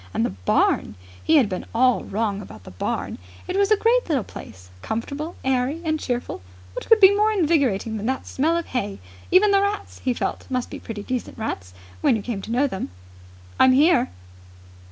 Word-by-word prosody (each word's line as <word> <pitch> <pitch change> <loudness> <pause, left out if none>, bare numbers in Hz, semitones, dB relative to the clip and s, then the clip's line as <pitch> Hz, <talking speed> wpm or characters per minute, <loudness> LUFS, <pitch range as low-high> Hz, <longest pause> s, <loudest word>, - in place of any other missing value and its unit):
And 115 - +2
the - - -2
barn! 95 +2 +1 0.3
He 320 - +3
had 270 -7 +5
been 185 -2 -4
all 250 +1 +3
wrong 205 -1 -2
about 110 - -12
the - - -11
barn. 90 - -3 0.3
It 365 - -3
was 400 0 +3
a 430 - +5
great 470 0 +2
little 275 -8 +1
place, 90 - -12
comfortable, 280 - -4
airy, 265 +4 +1
and 315 -1 0
cheerful. 245 - -3 0.3
What - - -6
could 450 - +6
be 395 0 +8
more 425 +1 +3
invigorating 280 - +1
than 215 +2 -4
that 265 0 -2
smell 320 +5 +1
of 340 - -3
hay? 205 -6 -3 0.3
Even 400 +3 +5
the 395 0 +4
rats, 405 +1 -3
he 255 -2 -1
felt, - - -3
must 255 -2 -2
be - - -6
pretty 210 -3 -7
decent 250 +2 -4
rats, 95 - -5 0.3
when - - +4
you 215 - -3
came 225 -5 -4
to 220 - -7
know 255 +4 +2
them. 195 -9 -4 0.7
"I'm 260 0 +6
here!" 310 - +4
255 Hz, 195 wpm, -23 LUFS, 210-335 Hz, 0.7 s, be